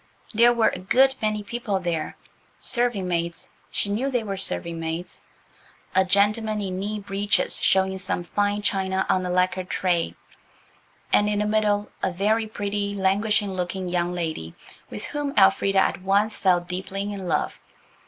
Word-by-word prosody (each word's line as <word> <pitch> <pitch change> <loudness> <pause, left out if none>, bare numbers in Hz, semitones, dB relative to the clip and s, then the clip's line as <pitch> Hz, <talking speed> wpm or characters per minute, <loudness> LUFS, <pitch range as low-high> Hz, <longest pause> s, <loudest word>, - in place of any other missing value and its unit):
There 235 +2 +6
were 235 -2 +3
a - - -6
good 260 +8 +4
many 215 -1 0
people 210 -2 -2
there: 170 -4 -3 0.4
serving 240 -6 +1
maids–she 170 +3 -3
knew 225 +7 -1
they 245 -4 0
were 200 -2 -3
serving 170 -3 -3
maids–a 175 +2 -5
gentleman 210 +3 +2
in 190 -2 -3
knee 210 +2 -3
breeches 200 +1 0
showing 190 0 +2
some 185 -2 -1
fine 205 +3 -1
china 190 -1 0
on 185 - +2
a - - -3
lacquered 180 0 0
tray, 175 -3 0 1.0
and 210 0 +4
in 210 - 0
the 210 - +1
middle 210 -1 +1
a 190 - 0
very 215 +5 +1
pretty, 205 -1 -2
languishing 200 +1 +1
looking 185 0 -3
young 175 0 0
lady 160 - -4 0.3
with 210 - -5
whom 290 -1 -3
Elfrida 195 0 +4
at 190 - +2
once 200 +3 +2
fell 180 -2 +3
deeply 185 +2 -4
in 195 -2 -6
love. 155 -3 -1
195 Hz, 155 wpm, -24 LUFS, 185-210 Hz, 1.0 s, There